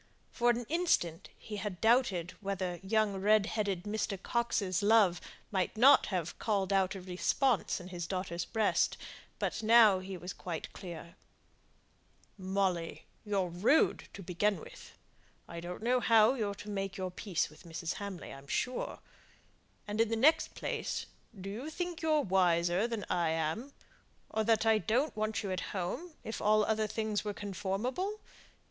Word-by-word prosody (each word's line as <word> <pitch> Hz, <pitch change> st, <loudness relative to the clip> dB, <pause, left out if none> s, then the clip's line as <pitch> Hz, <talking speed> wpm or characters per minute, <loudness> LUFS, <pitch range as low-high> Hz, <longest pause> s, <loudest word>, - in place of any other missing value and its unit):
For 240 Hz, 0 st, +2 dB
an 240 Hz, 0 st, +1 dB
instant 310 Hz, -, 0 dB
he 210 Hz, -2 st, -7 dB
had 200 Hz, -3 st, -4 dB
doubted 220 Hz, -7 st, +2 dB
whether 190 Hz, -3 st, -3 dB
young 205 Hz, 0 st, +1 dB
red 210 Hz, +1 st, +4 dB
headed 200 Hz, -5 st, -2 dB
Mr. 205 Hz, -2 st, -2 dB
Coxe's 205 Hz, -4 st, 0 dB
love 205 Hz, -4 st, +4 dB, 0.3 s
might 190 Hz, +1 st, -1 dB
not 265 Hz, +5 st, +7 dB
have 175 Hz, -5 st, -3 dB
called 200 Hz, -3 st, 0 dB
out 190 Hz, 0 st, +2 dB
a 190 Hz, -, -6 dB
response 190 Hz, +7 st, +1 dB
in 180 Hz, 0 st, -9 dB
his 175 Hz, -2 st, -5 dB
daughter's 185 Hz, -2 st, -3 dB
breast; 220 Hz, -2 st, +1 dB, 0.4 s
but -, -, -1 dB
he 210 Hz, -4 st, +4 dB
was 180 Hz, +1 st, -6 dB
quite 170 Hz, -3 st, -6 dB
clear 170 Hz, -2 st, -9 dB, 1.2 s
now. 190 Hz, -, -11 dB
"Molly, 185 Hz, -4 st, -1 dB, 0.2 s
you're 195 Hz, -4 st, 0 dB
rude 200 Hz, -, +2 dB
to 195 Hz, -, -8 dB
begin 190 Hz, +2 st, 0 dB
with. -, -, -12 dB, 0.5 s
I 170 Hz, -, -7 dB
don't 175 Hz, +4 st, -7 dB
know 250 Hz, +2 st, +3 dB
how 225 Hz, 0 st, +5 dB
you're 210 Hz, -6 st, -2 dB
to 210 Hz, +1 st, -9 dB
make 195 Hz, -1 st, -3 dB
your 185 Hz, -1 st, -3 dB
peace 180 Hz, -3 st, -2 dB
with 155 Hz, -, -16 dB
Mrs. 170 Hz, -1 st, -4 dB
Hamley, 200 Hz, -3 st, -6 dB
I'm 135 Hz, +1 st, -12 dB
sure. 250 Hz, -, -2 dB, 0.9 s
And 210 Hz, +2 st, 0 dB
in 225 Hz, -, +2 dB
the 225 Hz, -, 0 dB
next 300 Hz, +8 st, +3 dB
place, -, -, -3 dB, 0.3 s
do 190 Hz, -, -7 dB
you 230 Hz, +10 st, -5 dB
think 350 Hz, +1 st, -4 dB
you're 310 Hz, -2 st, +3 dB
wiser 180 Hz, -1 st, +2 dB
than 230 Hz, -4 st, -4 dB
I 170 Hz, -2 st, +1 dB
am; 160 Hz, -, -2 dB, 0.6 s
or 220 Hz, -, 0 dB
that 225 Hz, 0 st, +3 dB
I 220 Hz, -1 st, +4 dB
don't 250 Hz, +8 st, 0 dB
want 215 Hz, +1 st, -1 dB
you 195 Hz, -, -3 dB
at 185 Hz, -, -1 dB, 0.2 s
home, 305 Hz, -, -4 dB
if 220 Hz, -, -5 dB
all 215 Hz, 0 st, +4 dB
other 220 Hz, 0 st, +1 dB
things 215 Hz, -1 st, -2 dB
were 210 Hz, -1 st, -4 dB
conformable? 210 Hz, -, -3 dB
200 Hz, 160 wpm, -32 LUFS, 180-225 Hz, 1.2 s, not